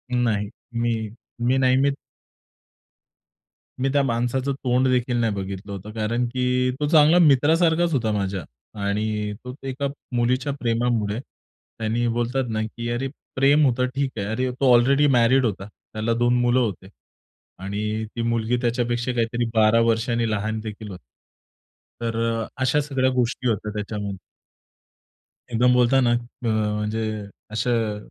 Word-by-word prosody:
नाही. 105 -4 0 0.2
मी, 115 -2 -1 0.3
मी 125 +2 +2
नेहमीच 135 +2 +3 1.8
मी 135 +1 +1
त्या 145 - +4
माणसाचं 125 +2 0
तोंड 125 +1 +2
देखील 125 -1 +1
नाही 115 -3 +1
बघितलं 100 0 -6
होतं, 100 +2 -7
कारण 115 +3 -1
की, 125 +1 0
तो 150 - 0
चांगला 155 +1 +6
मित्रासारखाच 160 +3 +4
होता 115 -5 +1
माझ्या. 95 -4 -2 0.4
आणि 105 +1 -1
तो 125 0 -7
एका 135 +2 -2 0.3
मुलीच्या 130 +4 +1
प्रेमामुळे, 115 -3 0 0.6
आणि 115 +2 0
बोलतात 120 +2 -1
ना, 110 -1 -1
की 115 +2 -5
अरे 120 +3 -1 0.3
प्रेम 140 +3 +4
होतं 125 0 +2
ठीक 140 -1 0
आहे. 100 - -2
अरे 125 +4 -1
तो 130 0 +2
ऑलरेडी 135 +5 +4
मॅरीड 125 +3 +4
होता, 100 -3 -2
त्याला 110 +2 -4
2 120 +1 +2
मुलं 120 +1 +3
होती, 100 -5 -2 0.7
आणि 105 +3 -3
ती 115 - -2
मुलगी 115 +1 0
त्याच्यापेक्षा 120 0 0
काहीतरी 120 0 0
12 110 0 +4
वर्षांनी 115 0 0
लहान 110 +1 -2
देखील 110 0 -7
होती. 90 -6 -10 1.0
तर 115 -1 -2 0.3
अ, - - -3 0.2
अशा 145 +3 +2
सगळ्या 135 -2 0
गोष्टी 125 0 -1
होत्या 105 -1 -2
त्याच्यामध्ये. 105 -1 -4 1.3
एकदम 125 +2 +3
बोलताना 125 0 +4
अ, 120 - +4 0.3
म्हणजे 105 0 0 0.5
अशा 115 +3 -1 0.2
अ, - - -7
120 Hz, 140 wpm, -23 LUFS, 110-130 Hz, 1.8 s, चांगला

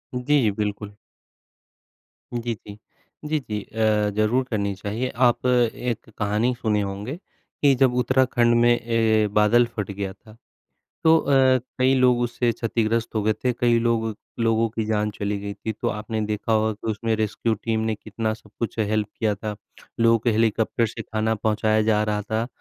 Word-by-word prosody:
जी, 125 -2 +2
बिल्कुल। 105 0 -3 1.4
जी, 120 0 -2
जी। 105 -1 -12 0.5
जी, 155 0 0
जी 105 -6 -5
अ, 110 -1 +1
ज़रूर 110 +5 +2
करनी 100 -3 -1
चाहिए। 105 +6 -3
आप 125 0 +2
एक 120 -2 0
कहानी 105 +4 +1
सुने 110 -3 0
होंगे, 100 +8 -4 0.4
कि 140 -2 +5
जब 130 -1 +3
उत्तराखंड 125 -2 +3
में 120 - +5
ए 110 -2 +2
बादल 105 +3 +4
फट 105 -2 -3
गया 100 -1 -4
था, 110 - -18 0.7
तो 160 0 +7
अ, 145 - +1 0.4
कई 130 +1 +4
लोग 125 -2 +4
उससे 120 0 0
क्षतिग्रस्त 115 0 -1
हो 110 - 0
गए 110 +1 +2
थे। 125 - +3
कई 120 -1 +2
लोग 115 -1 0 0.3
लोगों 115 0 +2
की 110 0 -3
जान 105 -1 0
चली 105 0 -3
गई 100 0 -5
थी 110 +2 -4
तो 110 - -3
आपने 110 +1 -3
देखा 105 +1 -2
होगा 110 0 +2
कि 110 +1 -5
उसमें 110 +1 -1
रेस्क्यू 110 +1 -1
टीम 110 +1 -2
ने 110 - 0
कितना 110 +1 -3
सब 110 -1 -18
कुछ 115 -1 -3
हेल्प 110 -1 0
किया 110 -2 +1
था। 105 +1 -5 0.4
लोगों 115 0 +5
को 115 +2 0
हेलीकॉप्टर 110 +1 +1
से 110 - -6
खाना 110 0 -1
पहुँचाया 110 0 +1
जा 105 -1 +3
रहा 105 -1 -1
था, 110 +2 -2
110 Hz, 175 wpm, -23 LUFS, 105-120 Hz, 1.4 s, तो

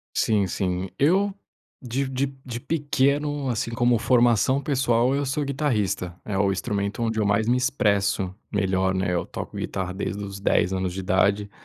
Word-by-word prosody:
Sim, 105 -3 +2
sim 90 0 -2
eu 190 +8 +3 0.5
de 130 +2 -2
de 135 +1 0 0.2
de 120 -1 -5
pequeno, 145 -1 0
assim, 115 -1 -1
como 120 0 +3
formação 120 +2 +3
pessoal, 130 -2 +2
eu 145 - 0
sou 140 +3 -1
guitarrista, 115 - -1
é 105 - -3
o 100 -1 +2
instrumento 100 +2 -2
onde 110 -1 -1
eu 105 - +2
mais 100 +2 +2
me 125 - +4
expresso 100 -8 +1 0.2
melhor, 95 -2 +1
né, 95 -1 0
eu 85 - 0
toco - - -7
guitarra 95 -1 -3
desde 100 +1 -3
os 100 -1 -6
10 95 -2 +2
anos 95 -1 -1
de 95 - -4
idade 100 +2 +1
110 Hz, 170 wpm, -24 LUFS, 95-130 Hz, 0.5 s, me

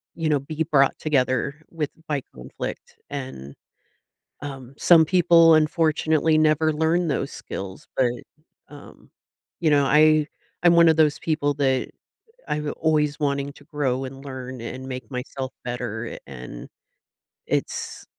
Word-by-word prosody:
you 165 -2 -1
know, 150 -2 +3
be 155 +3 -3
brought 140 -2 +4
together 140 0 0
with 155 -3 -2 0.2
by 145 -2 -1
conflict. 65 0 -8
And, 130 - -7 0.9
um, 135 -2 -8
some 165 -2 +6
people, 165 -1 +6
unfortunately, 155 0 +2
never 155 0 +3
learn 160 +3 +1
those 140 -1 -1
skills, 95 -1 -7
but, 125 -2 +2 0.6
um, 145 -1 -14 0.5
you 165 -3 +2
know, 145 -1 +4
I 155 +1 +5 0.4
I'm 175 -1 +6
one 170 0 +7
of 160 - +4
those 155 -2 +3
people 150 -3 0
that 135 -3 0 0.6
I'm 150 0 -2
always 150 -2 +1
wanting 140 -1 -1
to 145 - -17
grow 135 -4 -2
and 135 +1 -9
learn 130 -2 -7
and 130 +3 -7
make 130 +1 -7
myself 130 0 -5
better, 120 -2 -4
a - - -7
and 60 -3 -9 0.8
it's - - -3
145 Hz, 140 wpm, -24 LUFS, 130-155 Hz, 0.9 s, one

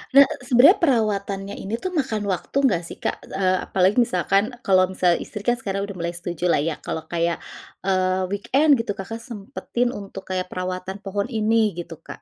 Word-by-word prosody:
Nah, 280 0 +10 0.2
sebenarnya 255 - +7
perawatannya 205 - 0
ini 225 +4 -4
tuh, 370 - -2
makan 220 -8 -1
waktu, 190 +8 -2
nggak 190 -11 +2
sih, - - -8
Kak? - - -3
E - - -13
eee, 185 -1 +2
apalagi 190 +3 +2
misalkan, 200 0 +2
kalau 185 -3 +4
misal 180 -2 +3
istri 210 - -7
kan 240 +3 +1
sekarang 195 -4 -3
udah 200 -1 -8
mulai 170 0 -3
setuju 175 0 -4
lah 170 -5 +3
ya, 160 +1 -2
kalau 160 - -4
kayak, 170 0 0 0.4
eee, 185 0 +1
weekend, 275 +9 +3
gitu, 230 -3 -2
Kakak 200 +4 -6
sempatin 235 +2 -3
untuk 195 -4 -8
kayak 185 -1 -1
perawatan 185 +1 -4
pohon 200 0 -2
ini, 220 -2 +2
gitu, 170 -1 -7
Kak. 165 - -11
195 Hz, 185 wpm, -23 LUFS, 185-230 Hz, 0.4 s, Nah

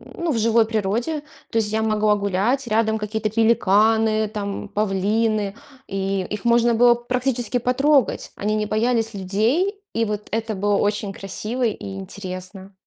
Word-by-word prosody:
ну, 340 -2 -1
в 235 - 0
живой 225 0 +3
природе. 225 +8 -1 0.3
То 230 - -1
есть 210 -2 +1
я 220 0 0
могла 215 -1 +2
гулять, 205 +7 0
рядом 220 0 +1
какие-то 215 0 -2
пеликаны 220 0 +3
там, 205 -2 -5
павлины, 210 +1 0 0.3
и 195 -1 -2
их 210 +2 -5
можно 235 0 +4
было 240 +1 +6
практически 245 0 -1
потрогать. 265 +2 +2
Они 210 +1 -1
не 215 0 0
боялись 225 +1 +1
людей, 235 - 0
и 230 0 +1
вот 210 -1 -4
это 225 0 -2
было 205 +1 +1
очень 205 0 0
красиво 215 +6 -4
и 200 -4 -2
интересно. 190 0 -8
215 Hz, 150 wpm, -22 LUFS, 200-235 Hz, 0.3 s, было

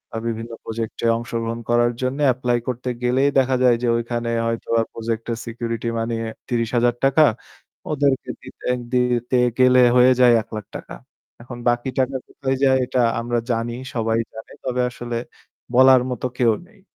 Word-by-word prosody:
আ - - -1
বিভিন্ন 115 +1 -4
project 115 0 -5
এ - - +4
অংশগ্রহণ 115 0 -4
করার 120 0 +3
জন্যে 135 +3 -1
apply 120 -1 0
করতে 125 0 -3
গেলেই 130 +3 +3
দেখা 130 0 +2
যায় 125 -2 +5
যে 120 - +1
ওইখানে 120 0 -3 0.2
হয়তোবা 115 0 0
project 115 0 -3
এর 115 - -2
security 115 0 -4
money 115 0 -1 0.3
৳৩০,০০০ 120 +5 +2 0.7
ওদেরকে 140 -3 0
দিতে - - -10 0.3
দিতে 125 0 +1 0.2
গেলে 130 0 +6
হয়ে 125 +1 +6
যায় 125 -1 +7
৳১,০০,০০০ 110 - -8 0.5
এখন 120 0 -9
বাকি 120 +2 0
টাকা 130 +1 0
কোথায় 135 -1 -2
যায় 130 -1 +5
এটা 125 0 0 0.2
আমরা 120 0 -1
জানি, 115 0 -2 0.2
সবাই 115 0 +1
জানে। 110 - -10
তবে 125 -1 -1
আসলে 120 -1 -5 0.6
বলার 130 0 +7
মতো 125 +1 -2
কেউ 120 -3 +4
নেই। 215 -1 -23
120 Hz, 150 wpm, -21 LUFS, 115-130 Hz, 0.7 s, যায়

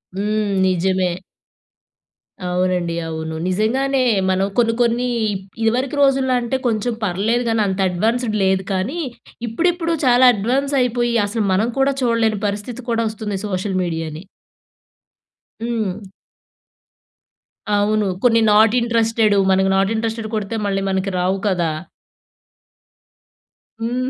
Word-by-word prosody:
హ్మ్, 210 +2 -1 0.2
నిజమే. 185 0 +1 1.4
అవునండి. 180 -1 0
అవును. 160 0 -5
నిజంగానే 255 +8 +1 0.3
మనం 190 +1 +2
కొన్ని, 230 -2 +3
కొన్ని 240 +1 +1 0.3
ఇప్ 190 -1 -5 0.2
ఇదివరకు 250 +5 0
రోజుల్లో, 270 -2 +3
అంటే 240 +2 -1
కొంచెం 230 +1 0
పర్లేదు 210 +6 0
గానీ, 225 -1 +1
అంత 190 0 -2
అడ్వాన్స్డ్ 220 +5 0
లేదు 190 0 +2
కానీ, 200 - -2 0.5
ఇప్పుడిప్పుడు 335 +7 0
చాలా 250 0 +6
అడ్వాన్స్ 265 +7 0
అయిపోయి, 240 -1 0
అసలు 220 +1 -2
మనం 215 +5 +1
కూడా 275 +1 +3
చూడలేని 230 -3 +1
పరిస్థితి 210 +5 -5
కూడా 230 0 +1
వస్తుంది 210 -2 -4
సోషల్ 190 0 -2
మీడియాని. 160 -1 -4 1.4
హ్మ్. 225 -5 -2 1.8
అవును. 210 0 +1 0.2
కొన్ని 230 -2 +4
నాట్ 215 +1 +5
ఇంట్రెస్టెడు, 225 -2 +2
మనకి 190 0 +3
నాట్ 195 +2 +2
ఇంట్రెస్టెడ్ 225 0 -3
కొడితే, 215 +1 -3
మళ్ళీ 195 -1 -1
మనకి 190 +1 -1
రావు 185 +2 +1
కదా! 175 -4 +1 2.1
హ్మ్. 245 +3 -2
215 Hz, 115 wpm, -19 LUFS, 190-240 Hz, 2.1 s, చాలా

